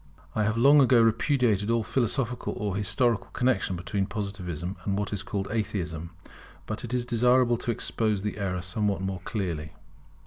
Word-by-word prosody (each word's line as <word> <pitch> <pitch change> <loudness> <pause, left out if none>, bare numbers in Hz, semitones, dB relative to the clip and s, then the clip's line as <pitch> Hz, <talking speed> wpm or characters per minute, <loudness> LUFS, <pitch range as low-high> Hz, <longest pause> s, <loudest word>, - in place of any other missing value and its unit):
I 110 - +1
have 110 +1 0
long 140 +5 +7
ago 125 -2 +5
repudiated 115 -2 +2
all 115 -1 +2
philosophical 125 0 -1
or 100 -2 -2
historical 115 +3 +1
connexion 125 -7 +1
between 95 +3 -2
Positivism 95 -4 -4
and 100 -1 -1
what 105 0 -2
is 100 - -2
called 100 0 -3
Atheism. 85 -7 -3 0.6
But 110 - -5
it 120 - -6
is 125 -1 0
desirable 125 0 +3
to - - -5
expose 110 -2 0
the 105 0 -3
error 90 -2 -2
somewhat 100 +1 0
more 95 -2 -3
clearly. 85 -8 -3
105 Hz, 165 wpm, -27 LUFS, 95-120 Hz, 0.6 s, long